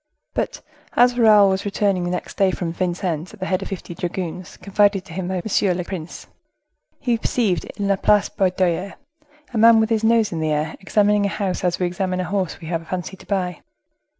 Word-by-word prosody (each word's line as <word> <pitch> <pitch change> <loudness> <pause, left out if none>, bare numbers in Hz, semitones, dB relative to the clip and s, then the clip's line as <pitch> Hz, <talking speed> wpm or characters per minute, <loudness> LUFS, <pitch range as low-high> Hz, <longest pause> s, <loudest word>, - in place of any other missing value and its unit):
But - - -3 0.3
as 245 0 +4
Raoul 215 -4 +6
was 190 0 -1
returning 200 -3 0
the - - -1
next 180 0 -4
day 195 -1 +3
from 175 -2 -3
Vincennes 175 0 -2
at - - -23
the 185 - -3
head 190 0 0
of - - -5
fifty 185 -2 -6
dragoons 175 -1 -5
confided 200 -1 +2
to - - -11
him 180 0 -3
by 185 -1 -2
Monsieur 195 -3 +2
le 180 - -2
Prince, 175 -2 -7 0.7
he 240 -4 0
perceived, 220 -6 0
in 200 - -1
La 200 -1 +2
Place 205 +1 +3
Baudoyer, 185 0 0 0.6
a - - -2
man 230 0 +7
with 220 +1 +1
his 225 -1 +1
nose 225 -1 +3
in 165 - -3
the 155 0 0
air, 150 +1 -1
examining 205 +1 +2
a - - -2
house 195 -3 -2
as 175 -1 +1
we 180 - 0
examine 185 +1 -2
a - - 0
horse 185 0 -2
we 165 - -9
have 165 0 -2
a - - -15
fancy 180 +2 -4
to - - -17
buy. 180 -4 -2
190 Hz, 215 wpm, -21 LUFS, 175-205 Hz, 0.7 s, man